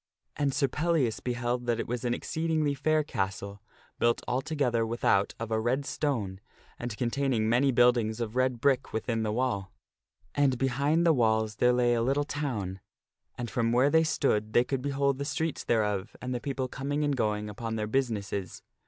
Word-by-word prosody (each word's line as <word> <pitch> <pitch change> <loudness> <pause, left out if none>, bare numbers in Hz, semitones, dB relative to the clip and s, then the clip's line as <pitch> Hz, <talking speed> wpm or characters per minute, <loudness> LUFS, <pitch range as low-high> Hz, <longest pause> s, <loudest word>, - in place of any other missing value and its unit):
And 145 -2 +1
Sir 140 0 +1
Pellias 150 -5 0
beheld 120 0 -2
that 120 -1 +1
it - - -3
was 120 +1 -3
an 120 -1 +1
exceedingly 160 -2 -1
fair 155 +2 +1
castle, 100 -4 -4 0.4
built 120 0 +2
altogether 125 -3 0
without 115 -3 +1
of 115 0 -5
a 110 - +2
red 130 +5 0
stone, 115 -12 -2 0.4
and 120 -3 -5
containing 125 -2 0
many 125 +4 +3
buildings 120 -2 +3
of 115 -1 -3
red 130 -1 +1
brick 135 +1 +1
within 115 0 -1
the 110 -1 -1
wall. 105 -5 -1 0.6
And 140 -3 +2
behind 140 +6 +1
the 165 - +6
walls 110 -4 +1
there 125 - +4
lay 125 -1 +3
a 115 - +1
little 135 +4 +1
town, 120 -11 -3 0.6
and 120 - -3
from 115 -1 +1
where 130 +4 +4
they 160 0 +5
stood 110 -9 0
they 120 - +5
could 135 0 -2
behold 140 0 0
the - - -1
streets 160 +2 -2
thereof, 105 -2 0
and 125 0 -4
the 120 - -3
people 135 -2 -2
coming 140 +4 -2
and 145 -1 +1
going 105 -3 -1
upon 110 +2 -4
their 110 -1 -1
businesses. 105 -6 -2
125 Hz, 180 wpm, -29 LUFS, 110-140 Hz, 0.6 s, the